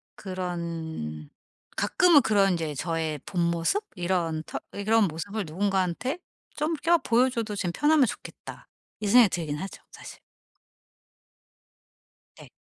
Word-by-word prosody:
그런 165 - -5 0.5
가끔은 310 - +5
그런 200 -4 +3
인제 160 -3 -2
저의 160 0 -2
본모습? 170 - 0
이런 175 -3 -1
터 - - -6
예 200 - -5
그런 220 +1 +4
모습을 200 +7 -4
누군가한테 190 - -1 0.4
좀 310 +2 0
껴 340 +3 +3
'보여 245 +2 +3
줘도 230 -4 -3
좀 185 -3 -1
편하면 295 -2 +4
좋겠다.' 220 - -8 0.3
이 210 - -2
생각이 230 0 +7
들긴 155 -5 -3
하죠 190 +6 -7
사실. - - -11 2.2
네. - - -13
190 Hz, 245 characters per minute, -27 LUFS, 165-225 Hz, 2.2 s, 생각이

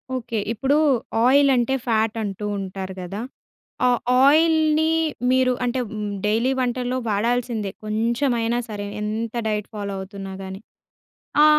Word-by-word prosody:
Okay. 230 -3 -3
ఇప్పుడు 270 +5 +1 0.5
oil 280 +2 +5
అంటే, 245 +1 +1
fat 220 -1 +1
అంటూ 205 0 -4
ఉంటారు 190 0 -5
గదా? 195 +4 -5 0.7
ఆ - - +5 0.4
ఆయిల్‌ని 315 +1 +4 0.4
మీరు 255 0 +3
అంటే 250 +1 0
హ్మ్, 210 -1 -4 0.2
డైలీ 225 +5 +2
వంటల్లో 250 0 -1
వాడాల్సిందే 225 0 0
కొంచెమైనా 235 +2 0
సరే. 205 -2 -5 0.2
ఎంత 220 +2 -3
డైట్ 210 -1 -2
ఫాలో 200 -1 -4
అవుతున్నా 195 0 -7
గాని. 190 0 -7 0.8
ఆ! - - +8
230 Hz, 125 wpm, -23 LUFS, 210-255 Hz, 0.8 s, ఆ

